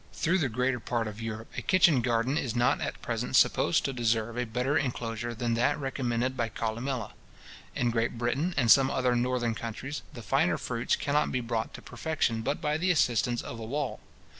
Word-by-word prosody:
Through 175 +4 +1
the 145 -6 +1
greater 125 +2 0
part 115 0 -2
of 105 +1 -7
Europe, 115 0 -6
a - - -3
kitchen 170 -8 +4
garden 120 +2 +1
is 125 -7 -1
not 120 0 +2
at - - -4
present - - -2
supposed 85 - +4
to 135 - -1
deserve 115 -1 0
a 125 0 -2
better 125 +5 0
inclosure 120 -3 -2
than 115 +1 -1
that 120 +5 +2
recommended 130 -2 -1
by 115 -3 -1
Columella. 115 +1 -3 0.6
In 120 -1 +1
Great 115 0 -1
Britain, 135 +9 -1
and 120 -5 +4
some 135 -1 +7
other 125 -2 +1
northern 120 -1 0
countries, 120 +6 -5
the 120 - -9
finer 145 +9 +2
fruits 120 -1 -1
cannot 145 +1 0
be 130 - 0
brought 115 -2 -3
to - - -11
perfection 145 -8 -1
but 140 +6 -1
by 150 +1 0
the 185 +3 +1
assistance 120 - +2
of 115 - -7
a - - -6
wall. 140 +4 -3
120 Hz, 195 wpm, -29 LUFS, 115-135 Hz, 0.6 s, some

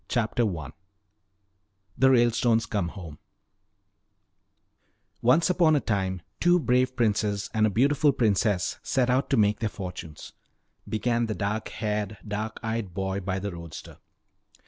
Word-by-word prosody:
CHAPTER 120 -1 +1
I 70 -3 -7 1.2
THE 130 - +4
RALESTONES 120 -2 +3
COME 100 -6 -1
HOME 85 -5 -9 2.0
"Once 140 +8 +4
upon 165 -4 +4
a - - +3
time 95 -6 -2 0.2
two 175 0 +4
brave 130 -3 +1
princes 105 -3 0
and 110 -1 +3
a - - +1
beautiful 140 +7 +3
princess 105 -6 +1
set 125 -2 +1
out 130 +2 +1
to 135 - +2
make 105 -1 +3
their 110 - -1
fortunes 90 -6 -8 0.3
" - - -22
began 115 +1 0
the 110 - -3
dark 105 +2 -2
haired, 105 -1 -3
dark 105 +1 -4
eyed 110 -5 -3
boy 95 0 -2
by 95 0 -3
the 100 +1 -4
roadster. 85 -2 -10
110 Hz, 140 wpm, -26 LUFS, 100-120 Hz, 2.0 s, THE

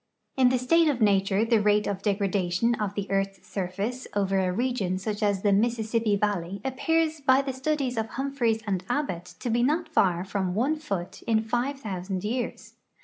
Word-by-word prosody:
In 255 -2 +5
the 255 - +2
state 330 +7 +3
of 285 -5 +1
nature 200 0 +3
the 225 -2 +3
rate 210 0 +3
of 195 -1 -3
degradation 200 +1 +1
of 210 -4 -3
the 200 - -2
earth's 195 0 -1
surface 200 +7 -3
over 195 -1 +1
a 185 -1 +1
region 210 -4 -1
such 210 +3 -4
as 205 -2 +1
the 205 -1 +4
Mississippi 225 0 +1
valley 200 -2 -1
appears 315 +4 0
by 265 0 +4
the 270 -1 -3
studies 265 -2 -1
of 220 0 0
Humphries 240 -4 -1
and 190 -3 -1
Abbot 185 - -2
to 240 - -2
be 240 +1 +2
not 310 +7 +1
far 185 - +2
from 190 -2 -2
one 265 +8 +1
foot 195 - -5
in 220 -1 +2
five 245 +5 -1
thousand 185 -3 -4
years. 240 +3 -4
220 Hz, 185 wpm, -27 LUFS, 195-255 Hz, -, In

